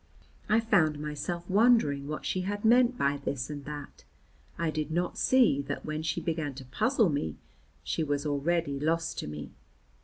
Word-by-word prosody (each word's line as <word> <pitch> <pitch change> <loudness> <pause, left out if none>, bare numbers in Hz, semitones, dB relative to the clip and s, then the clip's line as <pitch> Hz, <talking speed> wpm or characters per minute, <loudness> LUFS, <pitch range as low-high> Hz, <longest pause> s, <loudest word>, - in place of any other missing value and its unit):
I 215 +2 +5
found 175 -10 +3
myself 150 +4 -4
wondering 195 - +3
what 150 +1 -5
she 185 - -1
had 205 +3 -3
meant 245 +2 +5
by 140 +1 +1
this 140 0 -3
and 145 -2 -7
that; 145 -1 -8 0.5
I 165 -1 0
did 155 -1 -3
not 175 +2 -1
see 245 - +4
that - - -4
when 155 0 -3
she 155 -1 -1
began 155 -4 -2
to 135 0 -9
puzzle 220 - +2
me 140 - -2 0.5
she 160 - -1
was 145 -1 -1
already 145 0 0
lost 165 +2 0
to - - -4
me. 75 -1 -7
155 Hz, 175 wpm, -29 LUFS, 145-185 Hz, 0.5 s, I